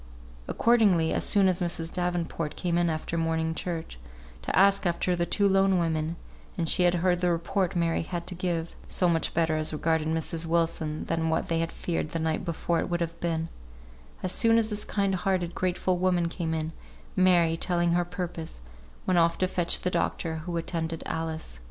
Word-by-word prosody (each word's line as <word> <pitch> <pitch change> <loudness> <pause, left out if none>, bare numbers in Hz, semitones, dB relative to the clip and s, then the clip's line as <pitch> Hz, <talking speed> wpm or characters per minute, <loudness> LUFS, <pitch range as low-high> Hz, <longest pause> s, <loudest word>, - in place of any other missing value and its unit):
Accordingly, 205 -9 +3
as - - 0
soon 200 -2 +4
as 185 -1 +1
Mrs. 170 -1 -2
Davenport 175 -3 -2
came 175 -2 -1
in 175 -1 +2
after 160 +1 -2
morning 160 0 0
church, 165 - -5 0.4
to - - -2
ask 195 0 +5
after 175 +1 0
the 170 0 -1
two 200 +4 +2
lone 195 -1 +3
women, 160 -1 0 0.4
and 170 -2 -1
she 180 - +2
had 175 0 +4
heard 175 -1 +2
the 180 - +2
report 180 +2 0
Mary 170 -1 +1
had 170 +1 -4
to 185 - -5
give 170 -2 -2
(so 180 - +2
much 165 -2 +1
better 160 -1 +2
as 155 0 -1
regarded 155 0 0
Mrs. 160 +1 -1
Wilson 165 -2 0
than 165 -1 0
what 160 - 0
they 165 -1 +1
had 165 0 -1
feared 165 -3 -3
the 165 - -1
night 160 0 -1
before 170 0 -1
it - - -2
would 175 0 -1
have 170 0 -3
been) 165 -1 -1 0.8
as 185 - -1
soon 225 +3 +4
as 225 -1 +1
this 210 0 -1
kind 200 -2 0
hearted, 185 -2 0
grateful 185 0 0
woman 180 -2 +2
came 165 -1 -2
in, 160 0 -2 0.4
Mary, 175 -3 +4
telling 175 0 +1
her 170 - +3
her 175 - +1
purpose, 175 - -6 0.5
went 180 -2 +3
off 170 0 +3
to 185 - +1
fetch 175 -2 +1
the 180 - -1
doctor 160 -2 -1
who 170 +2 -4
attended 165 -1 -3
Alice. 160 - -4
170 Hz, 195 wpm, -27 LUFS, 165-180 Hz, 0.8 s, ask